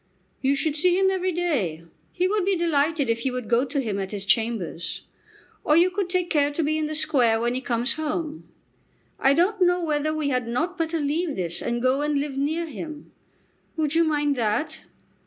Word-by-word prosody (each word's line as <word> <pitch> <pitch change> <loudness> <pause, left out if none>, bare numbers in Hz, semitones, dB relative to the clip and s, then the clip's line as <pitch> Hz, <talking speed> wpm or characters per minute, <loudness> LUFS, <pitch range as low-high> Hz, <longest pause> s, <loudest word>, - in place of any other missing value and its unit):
"You 275 +1 +2
should 285 +2 0
see 355 +3 +3
him 385 0 +3
every 370 -1 0
day. 265 - -1 0.3
He 360 +1 0
would 415 0 0
be 390 +1 +2
delighted 315 -3 +1
if 230 0 -1
you 265 - 0
would 250 -3 -4
go 240 +2 +3
to 280 +1 -2
him 215 -6 -2
at 190 -1 -4
his 200 -1 -4
chambers. 220 -6 -1 0.6
Or 300 - +4
you 355 +2 +5
could 380 -1 -2
take 360 -1 0
care 290 -2 +3
to 325 - -1
be 305 +1 +1
in 310 -1 -1
the 310 - -4
Square 270 -8 +3
when 240 +1 0
he 255 - -2
comes 240 0 +1
home. 315 0 -4 0.7
I 270 +1 +4
don't 375 +5 +1
know 355 0 +3
whether 300 0 0
we 310 -2 -1
had 250 -3 -1
not 315 +10 -1
better 330 -1 -1
leave 300 +2 -1
this 175 -2 -3
and 240 0 -2
go 260 +2 +2
and 295 -1 +1
live 285 -1 -3
near 310 +5 -1
him. 310 -1 -8 0.7
Would 305 -2 0
you 335 +1 +4
mind 295 -2 +1
that?" 225 +5 -1
295 Hz, 210 wpm, -24 LUFS, 250-335 Hz, 0.7 s, you